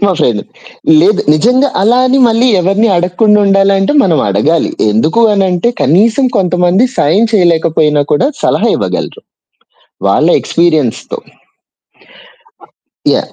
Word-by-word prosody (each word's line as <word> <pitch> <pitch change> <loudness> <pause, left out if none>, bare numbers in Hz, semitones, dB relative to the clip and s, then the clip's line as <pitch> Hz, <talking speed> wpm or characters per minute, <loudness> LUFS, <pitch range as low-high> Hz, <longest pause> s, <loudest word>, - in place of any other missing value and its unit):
మా 200 - +2
ఫ్రెండ్. 120 -9 -1 0.6
లేదు 200 +4 +2
నిజంగా 250 - +1
అలా 235 +5 +2
అని 265 +2 +1
మళ్ళీ 230 +3 +1
ఎవరిని 195 +5 0
అడగకుండా 185 +5 +1
ఉండాలంటే 195 +3 +1
మనం 165 -5 0
అడగాలి, 145 +12 0 0.2
ఎందుకు 155 - 0
అనంటే 190 +1 0
కనీసం 220 - +1
కొంతమంది 180 +4 +1
సాయం 180 +10 +1
చేయలేకపోయినా 160 -5 +1
కూడా 150 - +1 0.2
సలహా - - 0
ఇవ్వగలరు. - - -5 0.9
వాళ్ళ - - +1
ఎక్స్‌పీరియన్స్‌తో. 155 -8 -2 1.9
యాహ్! - - -1
185 Hz, 110 wpm, -10 LUFS, 160-215 Hz, 1.9 s, మా